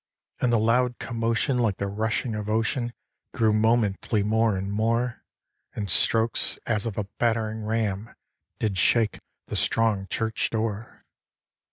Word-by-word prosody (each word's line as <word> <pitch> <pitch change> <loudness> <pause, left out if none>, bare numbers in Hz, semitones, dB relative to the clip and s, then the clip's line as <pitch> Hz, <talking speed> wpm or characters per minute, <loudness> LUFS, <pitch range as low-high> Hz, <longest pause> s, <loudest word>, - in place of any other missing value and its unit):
And 125 - +2
the 120 - +4
loud 120 +3 +2
commotion, 115 +2 0
like 110 -5 +1
the 100 - -2
rushing 110 +3 -1
of 105 -1 -4
ocean, 115 +2 0 0.4
Grew 110 -3 +3
momently 110 -1 +2
more 110 0 +2
and 95 +1 -3
more; 115 +2 0 0.5
And 100 -4 -3
strokes 115 +5 +2
as 110 -1 0
of 110 - -5
a 105 - 0 0.2
battering 110 -2 0
ram 110 -1 -2 0.4
Did 100 -4 -1
shake 110 +3 +3 0.3
the - - -5
strong 110 -4 +1
church 110 +1 -1
door. 110 -1 -4
110 Hz, 140 wpm, -26 LUFS, 105-115 Hz, 0.5 s, the